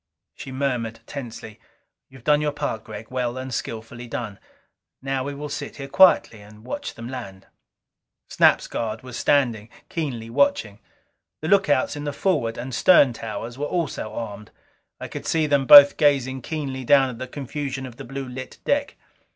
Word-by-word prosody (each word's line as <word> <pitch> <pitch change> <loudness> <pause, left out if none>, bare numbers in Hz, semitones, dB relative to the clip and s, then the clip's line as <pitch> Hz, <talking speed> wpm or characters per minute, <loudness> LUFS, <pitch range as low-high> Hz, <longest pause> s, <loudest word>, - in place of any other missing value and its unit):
She 135 - -9
murmured 125 -4 -2
tensely, 115 -6 -8 0.5
"You 130 - -14
have 120 - -18
done 150 +1 +3
your 150 -1 0
part, 145 -7 -3
Gregg. 110 +1 -10
Well 125 -1 -2
and 130 0 -5
skillfully 115 +2 -6
done. 110 -3 -5 0.6
Now 135 0 -2
we 140 +1 -5
will 150 +1 -6
sit 145 - -6
here 135 -1 -7
quietly 140 - +4
and 105 +2 -16
watch 130 - -5
them 115 +1 -8
land." 110 -7 -8 0.8
Snap's - - +4
guard 110 0 -4
was 125 -2 -9
standing, 115 -7 +1 0.2
keenly 130 -9 -4
watching. 115 -6 +1 0.6
The 155 - -3
lookouts 195 -11 +3
in 145 0 -6
the 145 - -3
forward 140 -9 0
and 125 +2 -6
stern 140 -4 +5
towers 115 +2 -6
were 145 - -1
also 165 -11 -3
armed; 105 -1 -7 0.5
I - - -6
could - - -7
see 160 -1 +2
them 140 -3 +1
both 145 -1 +10
gazing 135 -3 +2
keenly 135 -3 -4
down 135 0 +4
at 115 - -10
the 130 - -5
confusion 140 0 -5
of 125 -2 -10
the - - -8
blue 135 +1 -6
lit 130 +1 -8
deck. 285 0 0
130 Hz, 175 wpm, -23 LUFS, 115-145 Hz, 0.8 s, both